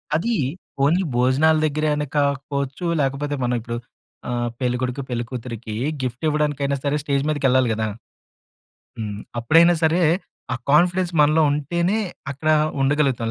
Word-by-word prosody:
అదీ, 230 +9 0 0.5
ఓన్లీ 170 +7 +3
భోజనాల 135 +6 +3
దగ్గరే 155 +1 0
అని 150 0 -1
కాకపోవచ్చు, 140 +2 -1 0.2
లేకపోతే 140 +2 -1
మనం 125 0 +1
ఇప్పుడు, 120 +1 -5 0.5
ఆహ్, 120 0 -1
పెళ్ళికొడుకు, 125 +1 -1
పెళ్ళికూతురికీ 120 -2 -5 0.3
గిఫ్ట్ 125 +4 -4
ఇవ్వడానికైనా 145 -2 0
సరే, 145 +1 +1
స్టేజ్ 140 -2 0
మీదకెళ్ళాలి 130 -4 +2
కదా! 110 0 -1 1.1
హ్మ్. 105 -2 -4 0.2
అప్పుడైనా 165 +8 +5
సరే, 165 +3 +3 0.5
ఆ - - -1 0.2
కాన్ఫిడెన్స్ 180 +3 +3
మనలో 155 +2 +4
ఉంటేనే 170 +8 0 0.3
అక్కడ 155 +3 -2 0.3
ఉండగలుగుతాం. 135 -5 +1
140 Hz, 120 wpm, -22 LUFS, 125-155 Hz, 1.1 s, అప్పుడైనా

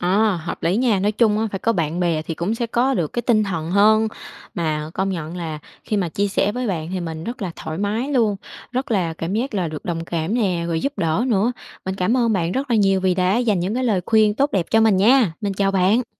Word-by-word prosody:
Ờ, 195 +2 +2
hợp 165 +1 -6
lý 170 +4 +1
nha. 230 -4 +2
Nói 205 +3 +1
chung 215 -1 +2
á 225 - 0
phải 195 - -2
có 230 - +1
bạn 165 -2 -1
bè 165 -3 +1
thì 165 - -5
cũng 185 +8 -2
sẽ 235 0 -2
có 250 +4 +1
được 165 -7 -1
cái 240 - -2
tinh 215 -3 +3
thần 165 -4 -3
hơn. 215 +3 +4 0.5
Mà 155 -2 -2
công 190 +1 0
nhận 165 -1 -5
là 160 -3 -4 0.3
khi 210 - -1
mà 180 -4 0
chia 200 +5 -1
sẻ 195 +1 +1
với 250 -1 -3
bạn 165 -5 -2
thì 185 - -2
mình 160 -2 -5
rất 235 -2 -5
là 185 - -2
thoải 160 +2 -6
mái 215 +6 -1
luôn, 220 -6 +2 0.4
rất 260 +1 -2
là 180 -6 +1
cảm 165 +4 -4
giác 240 +1 -2
là 180 -4 0
được 155 -1 -7
đồng 165 -2 -3
cảm 170 +5 -2
nè, 185 -8 0
rồi 165 -1 -1
giúp 280 0 -3
đỡ 165 +8 +1
nữa. 230 0 +2 0.3
Mình 190 0 -2
cảm 195 +7 +1
ơn 235 -3 +2
bạn 175 -2 0
rất 270 0 -2
là 230 - +3
nhiều 195 -2 +3
vì 185 -1 +2
đã 185 +3 +2
dành 215 -7 +1
những 190 +5 -1
cái 255 0 -1
lời 210 -6 +2
khuyên 215 -2 +4
tốt 280 +4 +1
đẹp 180 -4 0
cho 225 - +4
mình 220 -4 +4
nha. 220 -2 +4
Mình 200 -2 -1
chào 195 0 +1
bạn. 200 +6 +2
195 Hz, 265 wpm, -21 LUFS, 170-225 Hz, 0.5 s, hơn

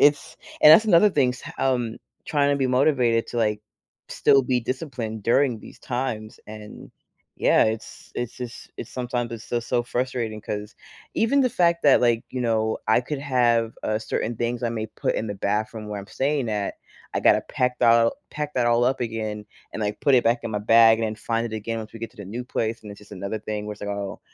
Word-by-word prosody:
it's 145 0 +3 0.3
and 150 - +10
that's 215 +7 +7
another 205 +1 +6
thing, 135 -6 +2
s - - -12 0.2
um, 120 -4 0 0.3
trying 145 -2 +1
to 140 - +2
be 135 - +1
motivated 125 -3 +2
to, - - -6
like, 105 -2 +1 0.5
still 140 - +4
be 125 -1 0
disciplined 125 -4 -4
during 120 +1 +2
these - - -13
times, 120 -4 -4
and, 105 0 -10 0.5
yeah, - - +4
it's 110 0 -5
it's 120 -1 -4
just 125 -1 -8
it's - - -7
sometimes 120 -1 -3
it's 115 -1 -7
so, 120 - -1
so 120 +1 -1
frustrating, 120 -3 -3
'cause 105 +1 -6 0.4
even 255 +5 +2
the 255 - +3
fact 170 -4 +2
that, 140 - +6
like, 120 -1 +3
you 130 - -4
know, 110 -2 0
I 110 - +5
could 140 +4 -4
have, 120 -4 +2
uh, 110 0 0
certain 110 +1 -3
things 120 +2 -2
I 120 - +1
may 110 -1 -3
put - - -2
in 110 - -2
the 100 - -4
bathroom 105 +2 -2
where 105 -1 -4
I'm 100 - -11
staying 135 0 -1
at, 105 -2 -2 0.4
I - - +1
gotta - - +5
pack 125 0 -1
that 115 - +6
all 115 0 +4 0.2
pack 150 0 -4
that 120 -2 +1
all 120 +1 +3
up 130 +1 +1
again 110 -3 -3 0.3
and, - - -5
like, 105 0 -2
put 140 -3 +4
it 125 - +5
back 120 +1 +2
in 115 - -3
my 105 - 0
bag 115 +1 +6
and 115 - 0
then 110 - -3
find 115 +2 -2
it 110 -1 -5
again 115 +2 -4
once 110 -1 -8
we 115 - -8
get 115 - -5
to 125 - -27
the 100 - -7
new 120 +6 -5
place, 115 -2 -3
and 105 - -9
it's 100 - -10
just 105 - -17
another 100 +3 -4
thing 105 0 -5
where 105 - -4
it's 105 - -13
like, 105 - -4
"Oh" 100 -1 -5
115 Hz, 230 wpm, -24 LUFS, 110-130 Hz, 0.5 s, and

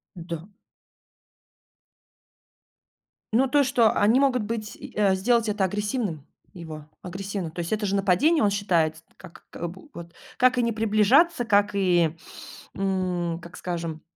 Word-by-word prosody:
Да. 170 0 -7 2.8
Ну 260 +4 +3
то, 285 +2 +3
что 235 -4 +3
они 225 +6 +3
могут 255 -5 +2
быть 215 -1 -5
и, - - -11
э, 200 -2 +3
сделать 230 +3 +1
это 205 -2 0
агрессивным 205 - -2 0.3
его, 160 -4 -9 0.2
агрессивным. 190 -1 -5
То 175 - -9
есть 170 +5 -2
это 215 -1 -1
же 200 0 0
нападение, 200 - +3
он 200 - +3
считает, 170 -6 +1
с 165 - -17
как 170 - -14
к 175 - -5
бу 190 - -12
вот 170 0 -10 0.2
как 255 0 +3
и - - +3
не 235 0 0
приближаться, 225 - +3
как 205 -1 +3
и, 175 -4 +2 0.6
м, 180 -3 -1
как 170 +1 -11
скажем 165 -3 -5
195 Hz, 150 wpm, -25 LUFS, 175-225 Hz, 2.8 s, Ну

